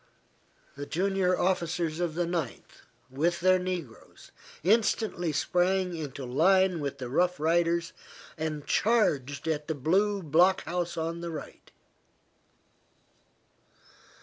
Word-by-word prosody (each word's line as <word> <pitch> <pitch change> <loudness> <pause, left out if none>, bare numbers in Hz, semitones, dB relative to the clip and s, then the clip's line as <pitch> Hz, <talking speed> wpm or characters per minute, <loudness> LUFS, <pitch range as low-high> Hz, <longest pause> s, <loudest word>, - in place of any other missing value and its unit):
The 145 0 -7
junior 185 +1 +1
officers 170 -3 -1
of 170 -3 -2
the 175 0 0
Ninth, 170 -7 -5 0.3
with 170 +6 0
their 185 +1 +4
negroes, 175 - -7 0.3
instantly 205 -3 +1
sprang 180 +3 +1
into 140 -4 -6
line 185 +7 +3
with 140 -2 -4
the 130 - -6
Rough 175 +7 +1
Riders, 170 +2 +1 0.4
and 155 -2 -4
charged 145 - +1
at 150 -2 -2
the 160 - -2
blue 195 +8 +1
block 175 +5 +3
house 175 0 -3
on 165 +1 -3
the 170 - -4
right. 160 -2 -9
170 Hz, 115 wpm, -28 LUFS, 155-185 Hz, 0.4 s, their